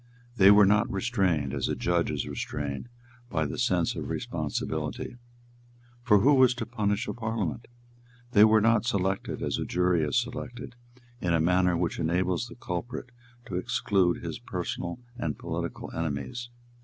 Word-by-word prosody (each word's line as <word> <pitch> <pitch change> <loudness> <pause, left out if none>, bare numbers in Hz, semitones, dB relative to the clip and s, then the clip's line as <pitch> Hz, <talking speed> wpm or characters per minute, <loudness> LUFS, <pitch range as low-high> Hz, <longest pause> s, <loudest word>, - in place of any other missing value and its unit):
They 95 -3 +7
were 105 0 +8
not 105 +1 +3
restrained, 95 - 0
as - - -1
a - - 0
judge 85 -1 +1
is 75 -4 -2
restrained, 70 - -4 0.4
by 80 -2 0
the 70 - -4
sense - - +2
of - - -5
responsibility; 80 - -3 0.8
for 105 -5 +4
who 140 +6 +5
was 130 -2 +5
to 115 - -3
punish 105 -1 -1
a - - -2
Parliament? 110 -3 -3 0.6
They 105 -3 +7
were 110 0 +6
not 115 -1 +4
selected, 95 -4 -1
as - - -1
a - - -1
jury 90 -1 +1
is 75 +5 0
selected, 120 0 -6 0.5
in 85 -2 +1
a - - +2
manner 90 +1 +3
which 85 -1 -1
enables 90 +6 0
the 120 - -11
culprit 120 +5 -5 0.3
to 95 -7 -4
exclude 90 -1 +1
his - - -5
personal 85 +3 -4 0.2
and 80 -9 -2
political - - -5
enemies. 80 - -3
95 Hz, 155 wpm, -28 LUFS, 85-115 Hz, 0.8 s, were